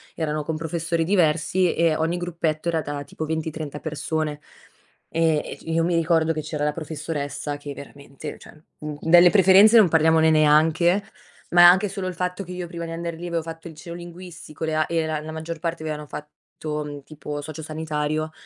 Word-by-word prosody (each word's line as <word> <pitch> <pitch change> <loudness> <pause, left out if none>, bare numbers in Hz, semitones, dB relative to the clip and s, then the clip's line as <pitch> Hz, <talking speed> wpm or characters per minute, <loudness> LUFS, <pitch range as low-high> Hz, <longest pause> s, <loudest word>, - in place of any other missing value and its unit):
erano 155 -2 -2
con 160 +2 -3
professori 165 +1 -2
diversi 175 0 +2
e 165 -1 +3
ogni 165 +2 0
gruppetto 170 -2 -2
era 165 -1 +1
da, 145 -1 -5
tipo, 155 - -6
20-30 155 -2 -4
persone 155 -1 -3 0.7
e 160 -2 +2
e - - -8
c - - -18
io 165 0 +1
mi 170 +1 +1
ricordo 165 -1 +2
che 155 - -4
c'era 150 0 -4
la 150 - +2
professoressa 150 -2 -4
che 145 0 -7
veramente 140 +1 -10
cioè, 155 - -16 0.2
mhmm, 150 -1 -6
delle 175 +2 +7
preferenze 200 +3 +7
non 210 -6 +7
parliamone 160 0 +4
neanche, 160 +5 +4 0.5
ma 175 0 +8
anche 190 +3 +4
solo 195 -1 -4
il 185 - -4
fatto 180 +2 -3
che 180 - -9
io 180 -1 -5
prima 170 0 -6
di 165 - -7
andar 170 0 -4
lì 175 +2 -7
avevo 170 -1 -1
fatto 165 +1 -8
il 165 - -9
liceo 170 +2 -9
linguistico 175 -2 -10
e - - 0
le 160 - -1
a 155 - +2
era 160 -2 0
la 155 +1 -7
maggior 160 +1 -6
parte 165 -1 -3
avevano 150 -1 -4
fatto, 150 0 -7
tipo 150 -1 -6
socio 155 +1 -7
sanitario, 155 0 -2
160 Hz, 190 wpm, -23 LUFS, 150-170 Hz, 0.7 s, ma